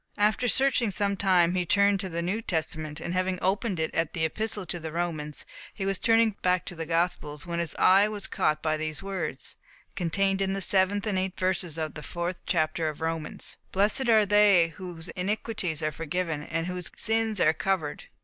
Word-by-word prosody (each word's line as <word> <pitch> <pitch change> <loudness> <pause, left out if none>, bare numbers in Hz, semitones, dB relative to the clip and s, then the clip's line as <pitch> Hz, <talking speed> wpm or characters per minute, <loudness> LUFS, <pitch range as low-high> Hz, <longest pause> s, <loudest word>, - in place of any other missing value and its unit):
After 215 +4 +2
searching 255 -2 +3
some 200 0 0
time, 180 -3 +3
he 180 -1 +1
turned 200 +3 +3
to 190 -1 -2
the 170 0 -3
New 195 +6 -1
Testament, 155 -5 -3
and 175 - -4
having 185 0 0
opened 195 0 0
it 160 - -1
at 165 -1 0
the 160 -2 +1
Epistle 210 +3 -1
to 175 - -3
the 160 -1 -6
Romans, 155 -3 -3 0.3
was 195 -1 -1
turning 225 -1 +4
back 180 -1 +1
to 180 - -6
the 165 -1 -5
Gospels, 165 -3 -1
when 170 -1 -3
his 170 -2 -3
eye 195 +3 +5
was 210 -2 -5
caught 155 0 0
by 155 -1 +1
these 155 +2 -4
words 180 -8 -3 0.4
(contained 195 +2 0
in 195 0 +1
the 195 - -2
seventh 195 +2 +2
and 200 -3 +1
eighth 190 0 -3
verses 180 -3 0
of 155 -1 -3
the 150 - -7
fourth 175 +3 -4
chapter 155 0 +1
of 150 - -8
Romans): 160 -1 -4
"Blessed 210 +6 +2
are 220 -2 +6
they 200 -4 +5
whose 175 -2 -8
iniquities 190 -4 -2
are 155 - +1
forgiven, 165 0 -3
and 165 +2 -3
whose 180 -1 -4
sins 225 -2 +1
are 155 - +4
covered. 160 -3 -2
180 Hz, 195 wpm, -27 LUFS, 165-200 Hz, 0.4 s, are